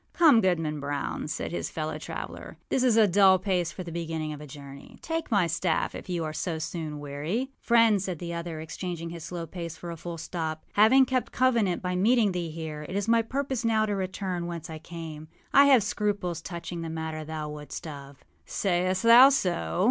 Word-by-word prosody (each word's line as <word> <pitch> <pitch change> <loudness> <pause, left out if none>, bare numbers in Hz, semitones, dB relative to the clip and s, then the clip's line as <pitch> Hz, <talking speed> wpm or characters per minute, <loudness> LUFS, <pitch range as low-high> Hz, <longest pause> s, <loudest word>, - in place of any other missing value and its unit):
âCome, 305 -9 +6
Goodman 165 -5 0
Brown,â 145 0 -3
cried - - -4
his - - -3
fellow - - -4
traveller, - - -7
âthis 255 - +2
is 240 -3 +4
a 220 - +7
dull 190 0 +6
pace 180 -3 0
for 185 - -7
the 170 - -8
beginning 160 -2 -3
of 150 - -9
a 150 - -9
journey. 140 0 -11
Take 325 0 -3
my 200 -6 +3
staff, 170 0 0
if - - -9
you 175 -2 -1
are 155 -1 -4
so 165 +1 -2
soon 155 -2 -4
weary.â 150 - -3
âFriend,â 230 -4 +4
said 185 -2 -3
the 170 +1 -5
other, 170 -1 -5
exchanging 165 +1 -5
his 170 -2 -7
slow 170 0 -5
pace 170 -1 -7
for 175 - -7
a - - -5
full 170 +1 -6
stop, 160 -1 -4
âhaving 250 +6 +6
kept 255 0 -1
covenant 230 -8 +2
by 180 0 -1
meeting 215 +2 +3
thee 175 -2 -3
here, 155 -1 -6
it 185 - -5
is 200 +1 -1
my 230 0 +4
purpose 260 +1 -2
now 220 -1 +2
to 205 -1 -1
return 185 -2 -3
whence 170 -2 -6
I 160 - -6
came. 160 -2 -8 0.3
I 280 +1 +8
have 265 -6 +6
scruples 200 -6 -1
touching 170 0 -6
the 165 - -4
matter 160 -1 -4
thou 155 -1 -5
wotâst 150 +2 -7
of.â 140 -3 -9 0.2
âSayest 185 0 0
thou 240 +4 +9
so? 175 - 0
175 Hz, 205 wpm, -27 LUFS, 160-210 Hz, 0.3 s, thou